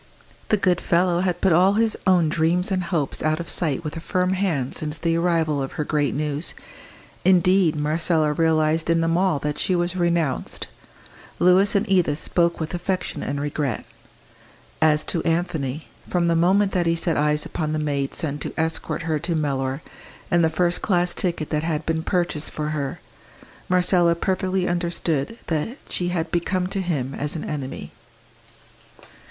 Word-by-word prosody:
The 215 - +4
good 180 -3 +1
fellow 175 0 +2
had 180 -1 -1
put 190 -3 +4
all 185 +4 +5
his 220 0 +2
own 180 -3 +4
dreams 170 +4 +1
and 185 -2 0
hopes 160 -6 -1
out 155 +1 +1
of 170 - -5
sight 160 -3 0
with 150 0 -5
a - - -4
firm 180 +2 0
hand 170 -9 -1
since 155 0 -3
the 165 0 0
arrival 165 -4 +1
of 135 - -4
her 150 - -2
great 145 -4 0
news. 150 +1 -2 0.7
Indeed, 185 -2 +4
Marcella 155 +1 +1
realised 160 0 +1
in 165 0 +3
them 165 0 +1
all 185 -3 +2
that 150 +1 -3
she 185 - +1
was 175 +1 0
renounced. 170 -6 0 0.7
Louis 185 +3 +4
and 200 - +2
Edith 180 -6 +2
spoke 170 +1 0
with 160 +1 -4
affection 180 +1 -2
and 140 - -3
regret. 145 -4 -2 1.0
As 155 -1 +4
to 165 - -2
Anthony, 160 -4 -1 0.2
from 175 -1 +1
the 170 - +2
moment 190 +4 +3
that 175 -2 0
he 165 - +2
set 165 0 0
eyes 150 0 +2
upon 155 -2 -3
the 155 - -1
maid 140 -3 -1
sent 145 -4 -2
to - - -5
escort 160 0 -1
her 160 -2 -1
to 170 +2 -2
Mellor, 135 -2 -1 0.5
and 175 -1 +4
the 160 - +4
first 175 +2 0
class 180 -3 +1
ticket 170 -4 -2
that 150 -1 +1
had 160 -1 -2
been 160 0 0
purchased 170 -3 -1
for 150 0 -4
her, 150 +1 -3 0.7
Marcella 180 -1 +3
perfectly 185 +1 -1
understood 170 0 -1
that 165 - -2
she 175 - -2
had 170 -2 -2
become 180 +1 0
to 195 - -2
him 140 -8 -2
as 145 +3 -2
an 160 - -4
enemy. 140 -3 -5
165 Hz, 175 wpm, -23 LUFS, 150-180 Hz, 1.0 s, all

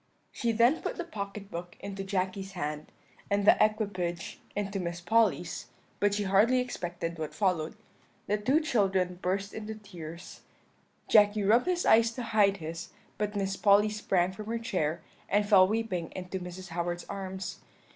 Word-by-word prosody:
"She 235 -2 0
then 235 +7 +4
put - - -3
the 350 - -2
pocket 200 - -7
book 175 +1 -7
into 195 0 -5
Jacky's 195 0 -2
hand, 150 -3 -4 0.4
and 200 0 +1
the - - +8
equipage 200 -6 -1 0.2
into 200 -1 -2
Miss 170 -1 -3
Polly's; 185 -1 +1 0.3
but 205 0 +2
she 205 - 0
hardly 205 +6 +4
expected 175 -8 -4
what 155 -1 -4
followed. 180 -4 0 0.5
The 210 +1 0
two 265 +9 +3
children 190 - +1
burst 195 +2 -1
into 220 0 -5
tears; 175 -5 -10 0.7
Jacky 210 -1 +5
rubbed 230 - +4
his 360 -1 +1
eyes 230 +1 +6
to 245 - -5
hide 210 -3 +3
his; 165 +1 -6 0.3
but 210 0 -1
Miss 195 -1 -1
Polly 205 +1 +5
sprang 190 -4 +1
from 210 +2 -8
her 230 +1 -1
chair, 170 -8 -2 0.3
and 205 +1 +2
fell 190 -3 +7
weeping 200 -6 -2
into 185 +1 -4
Mrs. 180 +1 -8
Howard's 175 +1 -2
arms. 190 -1 -5
195 Hz, 160 wpm, -29 LUFS, 180-215 Hz, 0.7 s, the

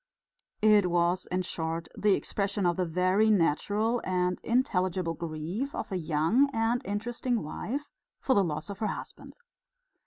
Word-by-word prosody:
It 210 -4 +5
was, 175 +1 +1
in 185 +1 -1
short, 165 -1 -3
the 205 -2 +3
expression 200 -1 -2
of 175 -1 +2
the 185 -2 -1
very 185 +6 +2
natural 210 +5 +2
and 180 -1 0
intelligible 185 -8 +1
grief 170 - -4
of - - -5
a - - -1
young 170 - +2
and 225 +2 +1
interesting 230 +3 -2
wife 265 - -5 0.3
for 265 - +2
the 200 - +4
loss 160 +3 -3
of 200 - -8
her 215 - 0
husband. - - -7
190 Hz, 150 wpm, -29 LUFS, 170-220 Hz, 0.3 s, It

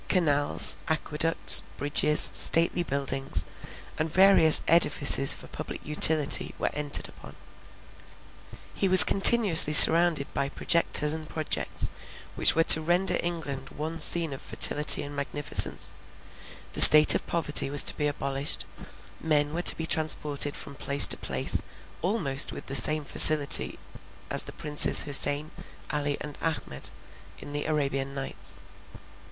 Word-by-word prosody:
Canals, 145 -6 -1
aqueducts, 160 0 +2 0.2
bridges, 150 +1 0
stately 170 +1 -1
buildings, 135 -3 -7 0.6
and 155 0 -7
various 185 -4 +1
edifices 145 -4 +2
for - - -16
public - - -13
utility, 150 0 +1
were - - -7
entered 145 -1 -3
upon; - - -19 1.4
he 195 - -5
was 185 0 +7
continually 195 -7 +4
surrounded 165 -1 +7
by 140 - -7
projectors 150 0 -1
and 160 -1 -12
projects, 155 -1 -5 0.4
which - - +1
were 165 - -2
to 160 - +4
render 180 +3 -4
England 145 -6 -10
one 160 +2 -11
scene 165 -1 +1
of 135 - -14
fertility 150 0 +1
and 145 0 -13
magnificence; 145 +1 -2 0.8
the - - -3
state 150 0 +8
of - - -7
poverty 150 -4 -4
was 145 0 +3
to - - -5
be 150 - -6
abolished; 140 -1 -6 0.5
men 150 -2 -4
were 170 - -7
to - - 0
be 160 - -8
transported 150 -3 -2
from 140 - -11
place 140 +1 +3
to - - +2
place - - -2 0.4
almost 160 -8 -3
with - - -14
the 135 - -9
same 150 +5 +2
facility 150 0 +4 0.5
as - - 0
the - - -13
Princes 150 -1 +3
Houssain, 145 +2 -3 0.4
Ali, 145 -1 -5
and 150 -1 -13
Ahmed, 155 - -8 0.5
in 145 - -15
the 145 0 -7
Arabian 140 -3 -7
Nights. 135 -1 -7
150 Hz, 135 wpm, -22 LUFS, 145-165 Hz, 1.4 s, state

